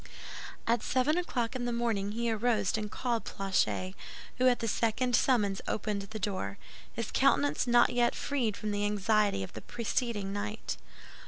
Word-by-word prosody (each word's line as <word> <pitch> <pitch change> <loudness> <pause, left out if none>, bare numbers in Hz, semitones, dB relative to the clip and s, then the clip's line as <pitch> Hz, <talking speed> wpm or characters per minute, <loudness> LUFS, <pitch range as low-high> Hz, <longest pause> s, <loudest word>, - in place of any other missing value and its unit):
At 230 0 +2
seven 260 +4 +2
o'clock 260 -9 -1
in 245 -1 -2
the 240 - -1
morning 225 -4 0
he 235 +1 0
arose 220 -3 +1
and 215 -1 -2
called 235 0 -1
Planchet, 190 -1 0 0.5
who 255 - +5
at 245 -1 +5
the 230 - -3
second 235 +3 +1
summons 205 -7 +2
opened 205 -1 -1
the 200 +3 -7
door, 185 - -3 0.3
his - - -4
countenance 145 - +3
not 240 0 +5
yet 240 0 +2
quite - - -8
freed 245 -8 -1
from 215 - -3
the 205 0 -1
anxiety 205 - +2
of - - -8
the - - -7
preceding 225 -4 -2
night. 65 - -3
220 Hz, 170 wpm, -31 LUFS, 200-240 Hz, 0.5 s, who